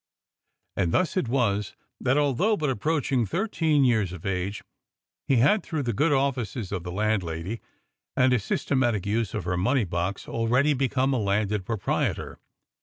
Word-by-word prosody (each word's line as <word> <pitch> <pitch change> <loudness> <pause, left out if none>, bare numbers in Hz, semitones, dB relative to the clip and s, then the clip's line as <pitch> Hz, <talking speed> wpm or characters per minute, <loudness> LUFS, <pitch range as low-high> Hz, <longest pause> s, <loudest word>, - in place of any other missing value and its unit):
And 85 -3 0
thus 185 - +1
it 185 -10 0
was 105 -6 0 0.2
that, 130 +2 +1
although 150 - +2
but 150 -3 0
approaching 135 0 0
thirteen 160 - +1
years 110 -7 +2
of 90 -3 -9
age, 95 +1 -2 0.6
he 135 - +3
had 145 - +4
through 155 -5 -3
the 120 -2 -1
good 150 +9 +2
offices 130 -6 -1
of 95 -3 -2
the 90 0 -6
landlady 95 -1 -2 0.6
and 130 0 +4
a 125 - +3
systematic 120 0 0
use 110 +2 -1
of 105 - -2
her 90 +1 -1
money 120 +6 +2
box 90 +3 -3
already 125 +6 +2
become 130 0 +1
a 130 - +1
landed 100 -1 0
proprietor. 110 -5 -2
115 Hz, 160 wpm, -26 LUFS, 100-140 Hz, 0.6 s, had